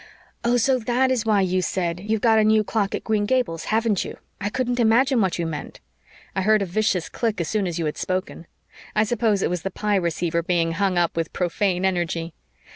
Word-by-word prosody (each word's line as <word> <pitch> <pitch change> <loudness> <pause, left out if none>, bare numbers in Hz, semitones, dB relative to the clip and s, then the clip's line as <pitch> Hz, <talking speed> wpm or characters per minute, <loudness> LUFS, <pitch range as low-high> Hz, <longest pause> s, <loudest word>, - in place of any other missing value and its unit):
"Oh, 240 +1 +3
so 255 +2 +2
that 245 +3 +1
is 235 -3 0
why 210 -2 +4
you 185 0 +1
said, 175 -1 -2
'You've 215 +2 -2
got 225 -2 +4
a - - +4
new 215 0 +4
clock 205 -2 -1
at - - -5
Green 210 -2 0
Gables, 240 -10 0
haven't 220 -3 +1
you?' - - -8 0.2
I 205 - -2
couldn't 245 +1 -1
imagine 240 +2 +4
what 190 -3 0
you 170 - -1
meant. 155 -2 -6 0.6
I 195 - +1
heard 215 +1 +3
a - - -2
vicious 185 -2 0
click 225 -5 -2
as 170 - -1
soon 210 -3 0
as 175 -1 -3
you 165 - -1
had 150 - -3
spoken. 185 -2 -3 0.5
I 215 - +4
suppose 220 -3 +1
it - - +1
was 180 -2 -2
the 195 - -3
Pye 205 +1 0
receiver 170 -1 0
being 165 -1 0
hung 185 +1 0
up 170 -1 +1
with 165 0 -2
profane 180 +1 0
energy. 170 -3 -1
200 Hz, 220 wpm, -23 LUFS, 175-220 Hz, 0.6 s, why